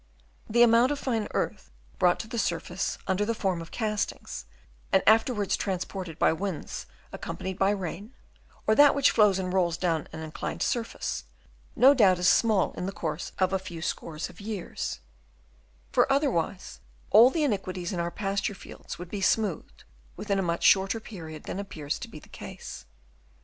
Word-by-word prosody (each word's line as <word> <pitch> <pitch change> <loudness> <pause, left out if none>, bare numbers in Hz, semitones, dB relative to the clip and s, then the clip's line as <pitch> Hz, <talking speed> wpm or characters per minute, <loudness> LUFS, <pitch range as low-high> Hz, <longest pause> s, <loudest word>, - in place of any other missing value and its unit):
The 235 +2 +5
amount 235 +3 +5
of 290 - -1
fine 230 -6 -1
earth - - -3 0.3
brought 175 -1 +4
to 225 - -10
the 230 +1 -3
surface 175 0 -2
under 190 +2 +1
the 230 +2 -1
form 185 -5 -1
of 165 - -9
castings, 215 - -3 0.5
and 190 - +4
after 225 +4 +5
wards 205 -5 0
transported 185 -3 -4
by - - +4
the 160 - -3
winds 195 -3 -4 0.2
accompanied 190 0 -5
by 195 - +4
rain, 200 +4 -4 0.5
or 215 - +4
that 290 +5 +7
which 280 - +4
flows 210 -4 +4
and 185 -1 -2
rolls 175 -3 +2
down 165 -4 0
an 160 - -7
inclined 155 -1 -4
surface, 230 -2 -2 0.5
no 270 +3 +7
doubt 200 -9 +5
is 180 0 +1
small 215 -1 +4
in 180 - -4
the - - -2
course 160 -3 -4
of 185 0 +1
a 190 - +2
few 185 -3 -8
scores 160 -2 -3
of 175 - -14
years; 205 -3 -4 0.9
for - - +3
otherwise 195 - 0 0.3
all 225 +5 +9
the 310 +3 0
inequalities 185 -7 -2
in 175 - -2
our 170 0 0
pasture 200 +1 -2
fields - - -9
would 175 0 -9
be 205 - -3
smoothed 200 -3 0 0.3
within 200 -2 -1
a - - +2
much 170 -2 -1
shorter 195 +3 +4
period 160 -8 -9
than 190 - -5
appears 155 -7 -4
to - - -6
be - - -11
the - - -14
case. - - -9
195 Hz, 180 wpm, -28 LUFS, 175-220 Hz, 0.9 s, all